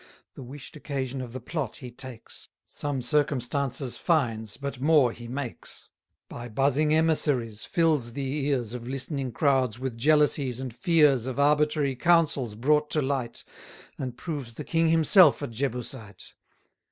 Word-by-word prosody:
The -, -, -11 dB
wish'd 135 Hz, +4 st, -10 dB
occasion 135 Hz, -3 st, -4 dB
of 125 Hz, -2 st, -7 dB
the 130 Hz, -, -6 dB
plot 135 Hz, -1 st, -4 dB
he 125 Hz, -, -9 dB
takes; 125 Hz, -2 st, -10 dB, 0.2 s
Some 140 Hz, -3 st, -3 dB
circumstances 140 Hz, -1 st, -1 dB
finds, 115 Hz, -, 0 dB
but 140 Hz, -2 st, -6 dB
more 145 Hz, -4 st, +4 dB
he 120 Hz, 0 st, -10 dB
makes; 130 Hz, 0 st, -7 dB, 0.4 s
By 120 Hz, 0 st, -8 dB
buzzing 140 Hz, +6 st, +1 dB
emissaries 145 Hz, -8 st, +1 dB
fills 155 Hz, -9 st, +1 dB
the 140 Hz, +1 st, -2 dB
ears 125 Hz, -6 st, -1 dB
210 125 Hz, 0 st, -6 dB
Of 120 Hz, -, -10 dB
listening 135 Hz, 0 st, -2 dB
crowds 130 Hz, -3 st, +1 dB
with 130 Hz, -1 st, -4 dB
jealousies 145 Hz, -1 st, +2 dB
and 130 Hz, -3 st, -6 dB
fears 150 Hz, -, +3 dB
Of 130 Hz, +1 st, -4 dB
arbitrary 150 Hz, -1 st, +2 dB
counsels 145 Hz, -6 st, +2 dB
brought 150 Hz, +6 st, +2 dB
to 155 Hz, -, +2 dB
light, 130 Hz, -3 st, -2 dB, 0.6 s
And 125 Hz, -2 st, -5 dB
proves 140 Hz, -7 st, -6 dB
the -, -, -6 dB
king 165 Hz, -1 st, +1 dB
himself 165 Hz, 0 st, +6 dB
a -, -, -2 dB
Jebusite. 120 Hz, -4 st, -5 dB
135 Hz, 150 wpm, -27 LUFS, 125-150 Hz, 0.6 s, himself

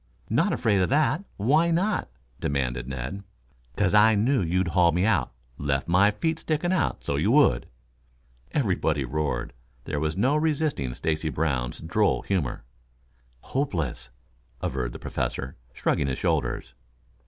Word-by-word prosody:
"Not -, -, +3 dB
afraid 105 Hz, -5 st, +2 dB
of 90 Hz, -, +1 dB
that? 155 Hz, +5 st, +2 dB
Why 150 Hz, +11 st, +3 dB
not?" 180 Hz, -, 0 dB, 0.3 s
demanded 60 Hz, -3 st, -1 dB
Ned. 65 Hz, +9 st, -5 dB, 0.5 s
"'Cause 100 Hz, -2 st, +2 dB
I 110 Hz, +1 st, +6 dB
knew 120 Hz, +5 st, +2 dB
you'd 90 Hz, +1 st, 0 dB
haul 85 Hz, -1 st, +4 dB
me 90 Hz, +4 st, +1 dB
out. 110 Hz, -, +2 dB, 0.3 s
Left 70 Hz, -1 st, -1 dB
my 90 Hz, +4 st, +5 dB
feet 160 Hz, +10 st, -1 dB
sticking 165 Hz, +3 st, 0 dB
out 170 Hz, -7 st, 0 dB
so -, -, -1 dB
you -, -, +1 dB
would." -, -, +4 dB, 0.8 s
Everybody 85 Hz, -, 0 dB
roared. 60 Hz, -3 st, -2 dB, 0.3 s
There 75 Hz, -, -3 dB
was 75 Hz, +2 st, -1 dB
no 130 Hz, +8 st, +3 dB
resisting 150 Hz, -, 0 dB
Stacy 80 Hz, 0 st, -1 dB
Brown's 70 Hz, -6 st, -1 dB
droll 100 Hz, +6 st, +1 dB
humor. 85 Hz, -12 st, -2 dB, 0.8 s
"Hopeless," 80 Hz, -, -2 dB, 0.5 s
averred -, -, -2 dB
the -, -, -6 dB
Professor, 65 Hz, 0 st, -4 dB, 0.2 s
shrugging 70 Hz, -, 0 dB
his 65 Hz, -, -2 dB
shoulders. 75 Hz, -8 st, -1 dB
90 Hz, 140 wpm, -26 LUFS, -, 0.8 s, I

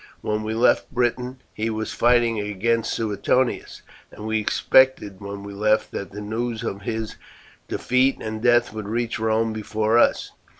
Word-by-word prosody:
When 105 Hz, 0 st, -1 dB
we 110 Hz, +1 st, -3 dB
left 120 Hz, +2 st, +3 dB
Britain 125 Hz, +1 st, -1 dB
he 110 Hz, +1 st, -2 dB
was 110 Hz, 0 st, -3 dB
fighting 120 Hz, -2 st, +3 dB
against 105 Hz, +3 st, 0 dB
Suetonius, 115 Hz, +3 st, -1 dB, 0.3 s
and 105 Hz, -, -9 dB
we 110 Hz, 0 st, 0 dB
expected 110 Hz, -3 st, +3 dB
when 100 Hz, 0 st, -7 dB
we 100 Hz, 0 st, -8 dB
left 105 Hz, +2 st, +1 dB
that 100 Hz, -, -5 dB
the 105 Hz, +1 st, -7 dB
news 110 Hz, +2 st, -3 dB
of 100 Hz, -, -4 dB
his 110 Hz, +1 st, -4 dB, 0.5 s
defeat 130 Hz, +2 st, +1 dB
and 110 Hz, 0 st, -5 dB
death 120 Hz, -1 st, +3 dB
would 110 Hz, -2 st, -6 dB
reach 115 Hz, +1 st, -2 dB
Rome 110 Hz, 0 st, +1 dB
before 110 Hz, +1 st, +1 dB
us. -, -, +2 dB
110 Hz, 160 wpm, -23 LUFS, 105-120 Hz, 0.5 s, left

